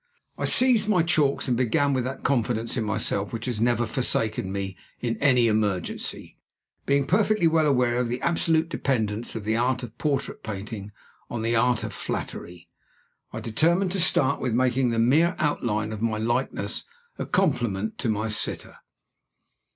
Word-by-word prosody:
I - - -3
seized 240 -4 +4
my 180 -5 +3
chalks 150 -5 +1
and 125 - +1
began 135 +4 +1
with 130 -2 0
that 130 +1 -5
confidence 115 -3 0
in 120 - -1
myself 105 -1 0
which 115 0 -5
has 120 -4 -2
never 120 0 +2
forsaken 110 -5 -1
me 95 -1 -4 0.2
in 115 -1 -2
any 125 -4 +4
emergency. 105 -5 -2 0.5
Being 140 0 +2
perfectly 210 +3 +2
well 160 -1 +3
aware 125 -3 +2
of 125 - 0
the 120 +2 -3
absolute 165 -1 +1
dependence 115 -8 -1
of 110 - -4
the 110 +2 0
art 125 +2 0
of 115 -2 -8
portrait 145 -3 -2
painting 105 0 -6 0.4
on 120 -2 -4
the 115 +1 +1
art 120 0 +2
of - - -5
flattery, 85 -1 -5 0.6
I - - -6
determined 170 - +1
to 195 - -1
start 145 -5 +3
with 125 -3 -1
making 130 0 +2
the 115 - -1
mere 150 +10 +3
outline 110 -8 -1
of 110 - -6
my 110 -2 0
likeness 120 +4 -1 0.4
a - - -3
compliment 120 - 0
to 120 - -1
my 110 +1 -1
sitter. 105 - -1
120 Hz, 165 wpm, -25 LUFS, 110-140 Hz, 0.6 s, seized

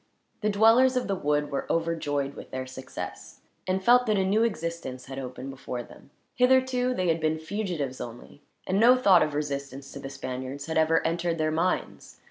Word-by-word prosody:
The 210 - +1
dwellers 225 +5 +5
of 250 - -1
the 195 - 0
wood 150 -3 0
were 140 - -2
overjoyed 150 -4 -1
with - - -10
their 130 0 -4
success, 130 0 -8 0.3
and 190 +1 0
felt 245 +3 +5
that 215 -1 +2
a 190 - +2
new 205 +4 +2
existence 170 - -3
had 135 0 -7
opened 130 +1 -6
before 125 -2 -6
them. - - -16 0.2
Hitherto 255 0 +3
they 185 -4 0
had 165 0 +1
been 155 0 +1
fugitives 160 -6 -3
only, 120 +4 -9 0.2
and 190 +2 +1
no 240 +3 +7
thought 195 -8 +6
of 150 -1 0
resistance 140 -2 -4
to 140 - -8
the 135 -1 -7
Spaniards 130 +1 -6
had 160 0 0
ever 160 +1 +3
entered 170 0 0
their 155 -1 0
minds. 170 +4 -2
160 Hz, 190 wpm, -27 LUFS, 140-200 Hz, 0.3 s, no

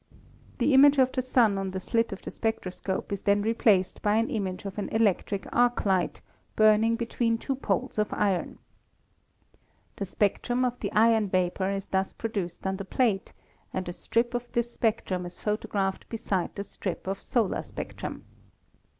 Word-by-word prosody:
The 290 - +2
image 280 +2 +7
of 260 -1 +4
the 255 - 0
Sun 240 -6 +3
on 195 0 -2
the 190 0 -4
slit 230 +4 0
of 195 - -7
the - - -6
spectroscope 195 -4 -3
is 200 - -3
then 205 0 +2
replaced 215 -4 +2
by 210 0 +2
an 225 +1 +1
image 190 -3 -3
of 195 +1 -5
an 205 - -3
electric 205 -2 +1
arc 245 -1 +2
light, 190 -3 +1 0.3
burning 215 +1 +5
between 230 0 0
two 270 - -2
poles 260 -3 -1
of 210 - 0
iron. 195 -4 0 1.4
The 200 - -2
spectrum 240 +6 0
of 245 0 -2
the - - -3
iron 220 -1 +4
vapor 185 +1 0
is 195 -1 -2
thus 190 0 -1
produced 195 -7 -4
on 190 0 -1
the 195 - -5
plate, 215 0 0 0.4
and 185 -1 -2
a 175 - -4
strip 235 +6 0
of 245 0 -4
this 240 0 0
spectrum 210 -5 0
is 175 0 -8
photographed 210 -2 -2
beside 210 -6 -2
the 200 - -3
strip 190 -2 -5
of 195 +1 -3
solar 225 -6 0
spectrum. - - -7
210 Hz, 170 wpm, -27 LUFS, 190-230 Hz, 1.4 s, image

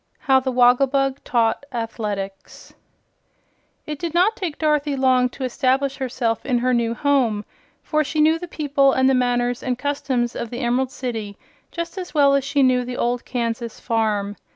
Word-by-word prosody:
How 265 -2 +3
the 260 0 -2
Wogglebug 265 +2 +3
Taught 230 +1 +1
Athletics 210 -5 -5 1.1
It 300 -1 -5
did 340 -1 -4
not 385 +6 +3
take 345 -8 -4
Dorothy 300 -2 +1
long 255 -1 +3
to 265 - -8
establish 265 +2 0
herself 245 -3 -2
in 255 -3 0
her 250 +1 +1
new 235 -1 0
home, 240 -6 +1 0.4
for 305 -1 +1
she 305 +2 -3
knew 315 +2 +4
the 355 - -7
people 280 -4 +2
and 260 0 +3
the 270 - +4
manners 245 -1 +1
and 250 -1 -2
customs 270 -3 -1
of 235 - -4
the 240 +3 -5
Emerald 250 +1 +1
City 225 -7 -5 0.3
just 340 +2 -5
as 360 -3 -8
well 280 -2 +5
as 275 -1 +2
she 280 0 +1
knew 255 -1 +3
the 245 0 -6
old 245 0 -1
Kansas 235 -2 -3
farm. 210 -3 -1
255 Hz, 175 wpm, -22 LUFS, 240-280 Hz, 1.1 s, well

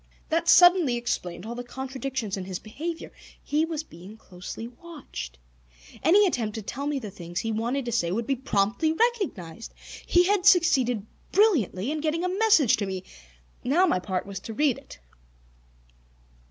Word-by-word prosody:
That 330 +1 +1
suddenly 355 -7 +6
explained 205 -7 -3
all 230 - -5
the 245 +1 -6
contradictions 265 -3 -4
in 190 -2 -5
his 185 -1 -4
behavior. 320 - -6 0.3
He 305 +2 +1
was 320 -2 -4
being 190 - -13
closely 195 +3 -8
watched. 250 - -9 0.6
Any 405 +5 +5
attempt 230 - -1
to 220 - -5
tell 280 +8 -4
me 295 -1 0
the 220 -6 -6
things 175 -2 -6
he 225 - -2
wanted 240 +5 -1
to 240 - -3
say 175 -7 0
would 225 +5 -1
be 270 - 0
promptly 235 +5 0
recognized. 320 - -2 0.3
He 350 - +5
had 395 0 +2
succeeded 270 - +4 0.3
brilliantly 290 - +2
in 310 -1 -2
getting 320 +2 -1
a 365 +1 -1
message 405 - +5
to 200 - -2
me. 190 -1 -4 0.6
Now, 320 +9 +3
my 325 - +2
part 185 0 -3
was 200 -1 -6
to 225 - -8
read 290 -2 +2
it! - - -14
250 Hz, 165 wpm, -26 LUFS, 205-325 Hz, 0.6 s, suddenly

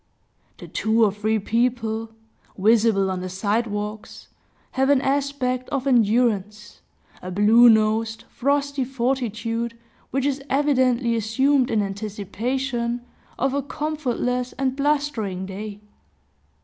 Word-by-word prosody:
The - - -10
two 220 +1 +2
or 205 - +2
three 215 +2 0
people, 225 0 -1 0.5
visible 210 -1 +3
on 185 -1 -3
the 185 - -4
side 205 +5 0
walks, 210 0 -6 0.4
have 265 +1 +1
an 285 -2 +5
aspect 270 -2 -1
of 275 -3 -2
endurance, 215 -4 +1 0.4
a 185 - -6
blue 215 +6 +6
nosed, 220 0 +2
frosty 280 +1 -1
fortitude, 235 -2 -2 0.3
which 270 +1 -1
is 280 -1 0
evidently 260 -4 +2
assumed 255 +5 +2
in 220 -3 +1
anticipation 235 +5 -3 0.4
of 270 +1 0
a 280 - 0
comfortless 255 -4 -2
and 265 0 -1
blustering 275 -10 -1
day. 205 +2 -7
235 Hz, 115 wpm, -23 LUFS, 215-265 Hz, 0.5 s, blue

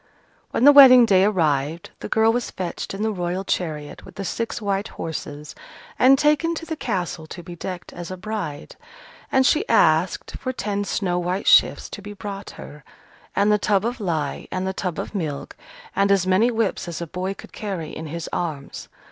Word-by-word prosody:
When - - -1
the 290 - +10
wedding 260 -4 +9
day 190 -3 +4
arrived, 160 -5 0
the - - -6
girl 220 +1 +3
was 245 0 -2
fetched 185 +1 -5
in 205 - -3
the 220 - +1
Royal 180 -1 -2
chariot 155 -6 -3
with - - -14
the 200 -1 -5
six 230 +5 -3
white 200 -1 -1
horses, 150 -4 -6 0.5
and 265 +2 +7
taken 300 +3 +2
to 330 - -6
the 320 - -4
castle 175 - -3
to 175 - -9
be 175 +1 -9
decked 180 +1 -7
as 175 -1 -7
a 185 - -6
bride. 190 -7 -5 0.5
And 265 0 +4
she 300 - +3
asked 160 +3 +3
for 255 - -3
ten 205 -3 -2
snow 180 -3 -1
white 180 +3 -2
shifts - - +5
to 205 - -7
be 205 +1 -8
brought 200 -1 -7
her, 150 -1 -11 0.5
and 200 +1 +3
the 210 - +3
tub 200 0 +1
of 240 +1 -2
lye, 160 -8 -2
and 185 0 -2
the 190 - -2
tub 180 -3 -3
of - - -5
milk, 155 -8 -4 0.4
and 200 0 +3
as 195 -2 +3
many 190 +6 +3
whips 225 -6 -1
as 170 -2 -5
a 170 - -4
boy 185 +4 -4
could - - -13
carry 190 -7 -5
in 160 - -6
his 165 +2 -5
arms. 155 -5 -4
190 Hz, 200 wpm, -23 LUFS, 170-215 Hz, 0.5 s, the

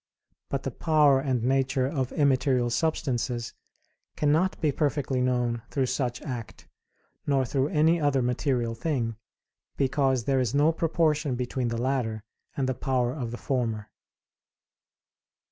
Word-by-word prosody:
But - - -2
the - - -3
power 150 -4 +4
and 130 -4 -1
nature 130 0 +1
of 135 -2 -2
immaterial 130 -4 +2
substances 120 -4 -1 0.6
cannot 155 +6 +1
be 155 -3 +2
perfectly 140 -3 0
known 125 -2 0
through 135 -2 0
such 125 -1 -2
act, 120 -6 -7 0.6
nor 135 -2 +2
through 135 +2 0
any 160 +2 +3
other 140 -3 +2
material 125 -1 0
thing, 115 -2 -2 0.6
because 135 -2 +1
there 135 +2 +1
is 125 0 0
no 150 +3 +4
proportion 160 -4 +1
between 125 0 -2
the 115 0 -2
latter 120 -4 -1 0.3
and 135 -2 0
the 130 - +1
power 125 -1 0
of 125 -6 -4
the 120 - -6
former. 115 -7 -2
130 Hz, 135 wpm, -27 LUFS, 120-145 Hz, 0.6 s, power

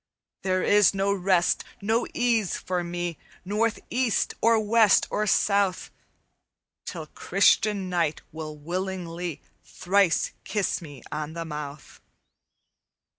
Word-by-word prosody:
"'There 185 -1 0
is 205 -1 +5
no 195 +1 +1
rest, 185 -2 +2 0.2
no 225 +4 0
ease 230 -6 +1
for 180 -1 -2
me 175 -1 -4 0.3
North, 215 +3 0
east, 250 -3 +1
or 230 -1 +4
west, 215 -1 +4
or 215 0 0
south, 200 -2 +2 1.0
Till 165 -4 -5
Christian 195 +4 +2
knight 170 -4 -1
will 155 -1 -7
willingly 175 -1 -4 0.2
Thrice 190 -1 +1
kiss 205 -4 -1
me 145 -5 -11
on 150 +1 -4
the 165 0 -5
mouth. 150 -2 -8
185 Hz, 115 wpm, -26 LUFS, 165-205 Hz, 1.0 s, is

